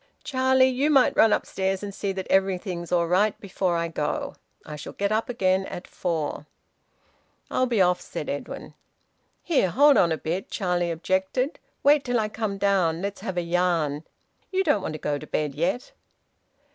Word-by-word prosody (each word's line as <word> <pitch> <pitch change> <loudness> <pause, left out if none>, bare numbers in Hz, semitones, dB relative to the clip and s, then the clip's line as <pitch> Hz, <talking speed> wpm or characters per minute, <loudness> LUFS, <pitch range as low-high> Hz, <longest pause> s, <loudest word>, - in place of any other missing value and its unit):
"Charlie, 260 -1 +3
you 260 +3 +1
might 275 -4 +4
run 220 - +5
upstairs 190 -1 -1
and 200 -1 -5
see 200 0 -2
that 190 -1 -4
everything's 185 -2 0
all 175 -1 +3
right 195 +5 +2
before 185 -3 -1
I 170 0 -1
go. 155 -2 -3 0.3
I 150 - -7
shall 150 - -8
get 200 +1 -1
up 220 +2 0
again 190 -5 +1
at 180 - -7
four." 160 -4 -3 1.0
"I'll 255 - +2
be 225 -6 +3
off," 180 0 +2
said - - -6
Edwin. - - -6 0.7
"Here! 275 - +2
Hold 285 - +5
on 170 - +4
a 160 - 0
bit," 175 +5 -3
Charlie 180 -3 -1
objected. 190 - -1 0.2
"Wait 285 0 +5
till 245 -2 0
I 215 -1 -1
come 215 -2 -3
down. 185 -4 +1
Let's 200 0 -4
have 190 -1 -4
a - - +2
yarn. 170 -4 0 0.5
You 380 0 +1
don't 295 - +2
want 155 - -4
to - - -4
go 145 -1 -2
to 155 - -10
bed 150 -2 -1
yet." 170 - -2
190 Hz, 180 wpm, -25 LUFS, 170-225 Hz, 1.0 s, run